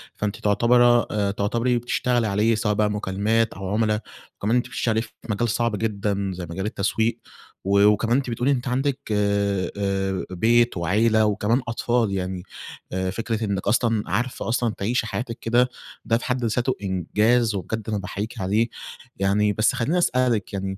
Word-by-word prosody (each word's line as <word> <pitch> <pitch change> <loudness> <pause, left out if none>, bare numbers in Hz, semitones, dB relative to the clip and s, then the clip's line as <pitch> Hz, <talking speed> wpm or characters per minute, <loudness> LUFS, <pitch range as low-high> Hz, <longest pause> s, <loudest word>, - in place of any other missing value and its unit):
فأنتِ 105 -1 -2
تعتبره 120 +3 +4
آآ 100 -2 0
تعتبري 115 +5 0
بتشتغلي 120 0 0
عليه، 105 +3 +2
سواء 110 -1 0
بقى 105 0 +1
مكالمات 105 +3 0
أو 95 0 -6
عملا، 110 0 +1 0.4
وكمان 110 +4 0
أنتِ 125 - +1
بتشتغلي 110 -1 0
في 110 - -9 0.2
مجال 110 +3 0
صعب 115 -1 0
جدًا 100 -2 -1
زي 90 -1 -6
مجال 95 +3 -4
التسويق، 110 +3 0 0.4
و 100 +1 +3
وكمان 115 +4 +3
أنتِ 135 -2 -2
بتقولي 120 +4 0
أنتِ 130 -1 -1
عندِك 135 +2 0
آآ 100 -2 +1
آآ 95 -2 -1
بيت 115 +4 +3
وعيلة 110 +6 +3
وكمان 105 +4 +1
أطفال 115 -1 0
يعني، 90 -1 -3 0.5
آآ 95 0 -1
فكرة 115 +2 -3
إنِك 100 -2 -2
أصلًا 115 -2 +2
عارفة 120 +6 -2
أصلًا 120 -2 0
تعيشي 115 +3 0
حياتِك 115 0 -4
كده، 120 +2 +2 0.4
ده 115 - +2
في 120 - -7
حد 125 -1 -1
ذاته 120 +3 0
إنجاز، 105 +5 +1
وبجد 110 +4 -4
أنا 105 - 0
باحيّيكِ 105 +4 -5
عليه، 105 +5 +1 0.5
يعني 105 +2 +2
بس 110 +2 +2
خلّيني 150 +10 0
أسألِك 125 - +1
يعني، 95 -1 -3
110 Hz, 165 wpm, -23 LUFS, 100-120 Hz, 0.5 s, تعتبره